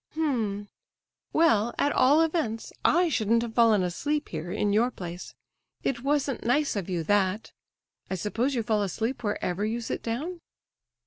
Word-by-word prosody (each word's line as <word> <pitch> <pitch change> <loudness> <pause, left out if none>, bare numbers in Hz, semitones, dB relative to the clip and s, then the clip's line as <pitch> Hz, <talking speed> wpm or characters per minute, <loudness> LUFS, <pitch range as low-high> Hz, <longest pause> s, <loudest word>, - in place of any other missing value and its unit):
"H'm—well, 235 0 -1
at 290 - +2
all 280 +5 +5
events, 305 -9 -2
I 350 +2 +4
shouldn't 230 -5 +2
have 230 -1 -5
fallen 225 -5 +4
asleep 290 - -2
here, 165 +2 -5
in 205 +2 0
your 230 +4 +3
place. 175 -6 -8 0.5
It 240 -3 -1
wasn't 280 -1 0
nice 285 +4 +1
of 195 -3 -3
you, 175 -3 -1
that. 205 +3 +1 0.6
I 190 - -1
suppose 230 +8 -1
you 235 - 0
fall 215 -1 +1
asleep 225 +7 -2
wherever 205 -2 -1
you 225 +2 -1
sit 230 - -4
down?" 310 +10 -4
225 Hz, 150 wpm, -27 LUFS, 205-280 Hz, 0.6 s, all